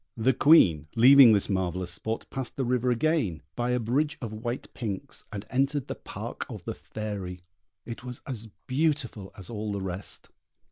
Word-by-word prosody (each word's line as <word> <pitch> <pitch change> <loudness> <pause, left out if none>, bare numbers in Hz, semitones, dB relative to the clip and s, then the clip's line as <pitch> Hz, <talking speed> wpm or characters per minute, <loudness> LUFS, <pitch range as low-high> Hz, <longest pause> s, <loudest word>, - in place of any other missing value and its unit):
The 120 +4 +3
Queen, 90 - +5
leaving 130 +1 +9
this 100 - +2
marvellous 90 -2 -1
spot, 110 +4 -3
passed 130 -2 -5
the 135 - -1
river 125 0 +1
again, 125 - +1
by 120 0 -1
a 125 0 +2
bridge 135 +7 0
of 115 -3 -5
white 120 +3 -5
pinks, 105 -6 -5
and 100 0 -6
entered 135 +1 +1
the - - -3
park - - -6
of - - -8
the - - -3
Fairy. 100 -4 -6 0.4
It 115 0 -7
was 125 -1 -7
as 115 -4 -6 0.2
beautiful 135 -8 -1
as 95 +3 -9
all 105 -1 -3
the 100 - -2
rest. 95 +1 -7
115 Hz, 175 wpm, -27 LUFS, 100-130 Hz, 0.4 s, leaving